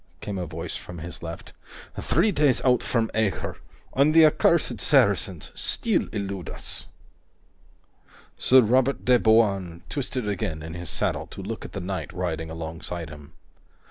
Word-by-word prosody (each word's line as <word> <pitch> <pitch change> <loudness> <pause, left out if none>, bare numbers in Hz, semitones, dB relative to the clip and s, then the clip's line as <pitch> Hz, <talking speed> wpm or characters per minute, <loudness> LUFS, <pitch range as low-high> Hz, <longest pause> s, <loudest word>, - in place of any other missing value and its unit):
came 100 -2 -4
a 90 - -3
voice 80 +1 -5
from 90 - -8
his 85 +2 -7
left. - - -8 0.4
"Three 215 - +2
days 145 -7 +3
out 125 -2 +4
from 115 -2 0
Acre, 110 -3 -1 0.4
and 145 +4 +3
the 165 -1 +9
accursed 155 - +3
Saracens - - +2
still 225 -5 0
elude 100 -5 -4
us." - - -6 1.5
Sir 130 0 +6
Robert 130 +4 +2
de 125 -1 +5
Bouain 100 -7 +2
twisted 130 -5 -3
again 100 -6 -2
in 80 +1 -7
his 85 0 -6
saddle - - -1
to - - -9
look - - -5
at - - -10
the - - -4
knight 95 +1 -4
riding 80 -3 -3
alongside 80 0 -6
him. 75 +1 -12
100 Hz, 150 wpm, -25 LUFS, 85-125 Hz, 1.5 s, the